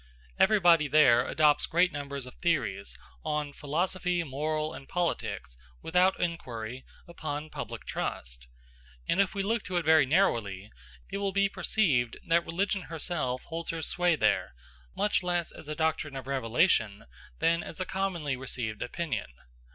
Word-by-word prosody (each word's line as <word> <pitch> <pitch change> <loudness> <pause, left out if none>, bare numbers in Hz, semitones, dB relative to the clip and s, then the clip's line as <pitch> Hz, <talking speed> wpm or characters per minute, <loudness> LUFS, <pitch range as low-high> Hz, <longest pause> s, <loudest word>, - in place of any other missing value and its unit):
Everybody 175 -7 +5
there 130 -5 +5
adopts 150 -1 +3
great 180 +2 +3
numbers 140 -2 -4
of 125 - -10
theories, 100 - -1 0.3
on 150 -2 -2
philosophy, 175 +4 -1
morals, 155 +2 -2
and 135 - -11
politics, 170 - -2 0.2
without 180 +3 +3
inquiry, 125 -8 -4 0.2
upon 155 -2 -5
public - - -6
trust; - - -4 0.6
and 190 - +3
if 195 - -1
we 195 - 0
look 225 +2 0
to 185 - -2
it 175 - 0
very 160 -3 +6
narrowly, 110 - +1 0.4
it 200 - -2
will 200 -1 0
be 200 0 +3
perceived 145 - +1
that 170 +1 +4
religion 195 +3 0
herself 155 -6 -2
holds 165 0 -5
her 165 -1 -3
sway 175 0 +2
there, 105 - +1 0.4
much 210 - +1
less 175 -2 -1
as - - -12
a 155 - -4
doctrine 155 -2 -1
of 135 -2 -6
revelation 115 - +1 0.3
than 170 - +2
as 165 - -8
a 185 - -1
commonly 180 -8 -2
received 120 -4 -4
opinion. 125 - -3
155 Hz, 150 wpm, -29 LUFS, 130-175 Hz, 0.6 s, very